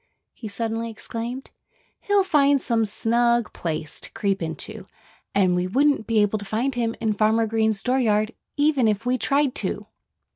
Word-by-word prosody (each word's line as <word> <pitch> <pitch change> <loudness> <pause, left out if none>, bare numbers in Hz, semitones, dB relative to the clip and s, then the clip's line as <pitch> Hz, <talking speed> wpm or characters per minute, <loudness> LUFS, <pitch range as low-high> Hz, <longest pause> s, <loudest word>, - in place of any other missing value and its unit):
he 220 - -8
suddenly 225 +2 -3
exclaimed. 230 +3 -5 0.5
"He'll 405 -1 +2
find 285 -6 +3
some 230 -3 +1
snug 235 +2 +1
place 155 -2 -4
to - - -3
creep 200 -2 -1
into. 160 -1 -4 0.5
And 190 -3 +3
we 180 0 0
wouldn't 275 +3 +2
be 220 -2 +3
able 205 +1 0
to - - -6
find 225 +7 -1
him 230 -2 -1
in 220 -2 0
Farmer 220 +2 +2
Green's 220 -1 0
dooryard 230 -4 +1 0.2
even 290 -5 +3
if 215 +1 0
we 250 +1 +1
tried 280 0 +2
to." - - -3
225 Hz, 160 wpm, -23 LUFS, 210-255 Hz, 0.5 s, find